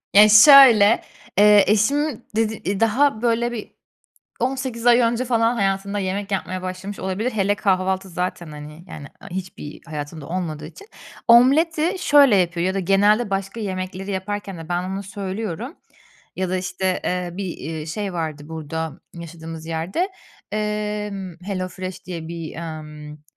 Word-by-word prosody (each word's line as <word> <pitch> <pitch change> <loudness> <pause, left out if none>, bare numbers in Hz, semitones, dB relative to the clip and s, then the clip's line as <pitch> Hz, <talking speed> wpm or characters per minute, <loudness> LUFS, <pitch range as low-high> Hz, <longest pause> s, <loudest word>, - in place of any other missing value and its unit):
Ya, 210 +1 +9
şöyle, 230 -2 +8 0.4
eee, 210 -1 +7
eşim 245 +5 +1
d 215 -3 -1
daha 225 +2 +2
böyle 235 0 +1
bir 225 -3 -7 0.7
18 255 -2 -2
ay 240 0 +7
önce 235 +1 +1
falan 230 -1 +2
hayatında 200 0 -1
yemek 195 +2 -3
yapmaya 185 -1 -3
başlamış 185 +2 -6
olabilir. 195 +7 -2
Hele 205 -1 +1
kahvaltı 190 -1 0
zaten, 180 -1 -4
hani, 150 +3 -10
yani, 145 -5 -9 0.2
hiçbir 180 -5 -7
hayatında 150 -1 -7
olmadığı 160 -4 -4
için. 400 - -14 0.4
Omleti 310 - +4
şöyle 280 -7 +5
yapıyor 175 -2 +1
ya 190 - 0
da 195 - -1
genelde 205 +4 +3
başka 195 +3 -3
yemekleri 190 -1 -4
yaparken 195 0 -4
de 165 0 -10
ben 175 0 -1
ona 190 +2 -4
söylüyorum, 200 - -5 0.6
ya 185 -1 -2
da, 185 - 0
işte, 185 0 -2
eee, 180 -1 -1
bir, 185 -2 -5
eee, 155 +1 -6
şey, 195 +4 -4
vardı 155 -4 -4
burada 160 0 -5
yaşadığımız 165 -1 -9
yerde, 165 - -4 0.5
emm, 210 -3 -3
Hello 185 -2 -3
Fresh 185 0 -8
diye 170 -3 -6
bir, 165 -1 -7
ımm, 150 -2 -8
195 Hz, 145 wpm, -22 LUFS, 175-215 Hz, 0.7 s, Ya